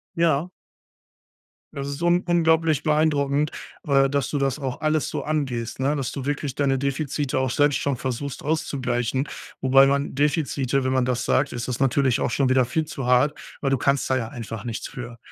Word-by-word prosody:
Ja. 165 0 +2 1.2
Das 140 0 -4
ist 140 +2 -6
un 175 +1 +3
unglaublich 160 -3 +2
beeindruckend, 150 -1 +2 0.3
äh, 135 -1 +4
dass 140 -1 0
du 145 - -1
das 135 -1 0
auch 135 -4 -4
alles 155 -1 0
so - - -3
angehst, 130 -7 -2
ne? 140 +3 +1
Dass 135 -3 -2
du 135 - -5
wirklich 145 -2 -2
deine 135 -2 +1
Defizite 140 0 -2
auch 130 0 0
selbst 145 +2 +3
schon 140 -2 -1
versuchst 130 +2 -4
auszugleichen. 130 -4 -1 0.3
Wobei 135 +1 +6
man 140 0 0
Defizite, 140 -2 0
wenn 130 - +1
man 130 -1 +2
das 125 -1 -1
sagt, 140 +1 +2
ist 120 -1 -4
das 125 -2 -3
natürlich 135 -1 +2
auch - - 0
schon 135 +1 +1
wieder 130 0 +4
viel 155 +6 -1
zu 140 -4 -6
hart, 125 +4 +3 0.2
weil 140 - 0
du 135 - +2
kannst 140 +2 +1
da 130 - +3
ja 115 -4 -2
einfach 115 -2 -7
nichts 115 -2 -4
für. 120 -3 -8
140 Hz, 190 wpm, -24 LUFS, 130-150 Hz, 1.2 s, Wobei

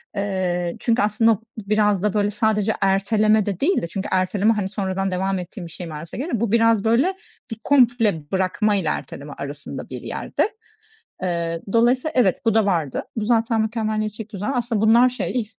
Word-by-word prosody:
Eee, 185 -3 -1
çünkü 235 +1 +1
aslında 215 0 +3 0.2
biraz 210 -1 +1
da 210 - +1
böyle 205 0 +1
sadece 215 0 +1
erteleme 210 +2 +3
de 195 -3 -3
değil 375 +7 +2
de 170 - -3
çünkü 195 +3 -4
erteleme, 195 +4 +2
hani, 205 -3 -2
sonradan 195 -1 -2
devam 190 +1 -1
ettiğin 180 +1 -8
bir - - -13
şey, 175 0 -7
manasına 155 +4 -8
geliyor. 265 -6 -2
Bu 225 -3 -1
biraz, 230 -2 +3
böyle, 245 +12 +3 0.4
bir 225 - -5
komple 230 - +2
bırakmayla 190 -1 +1
erteleme 145 0 -8
arasında 145 +1 -7
bir - - -6
yerde. 435 - -2 0.7
Eee, 170 -2 -2
dolayısıyla 250 +6 +2
evet, 235 -8 +3
bu 220 - +3
da 220 -2 +3
vardı. 165 -8 0
Bu 220 - -1
zaten 225 0 +2
mükemmeliyetçilik 215 -1 -3
düzen. 205 +6 -3
Aslında 235 -3 -1
bunlar 235 +3 +5
şey 245 -3 -3
210 Hz, 170 wpm, -22 LUFS, 185-225 Hz, 0.7 s, bunlar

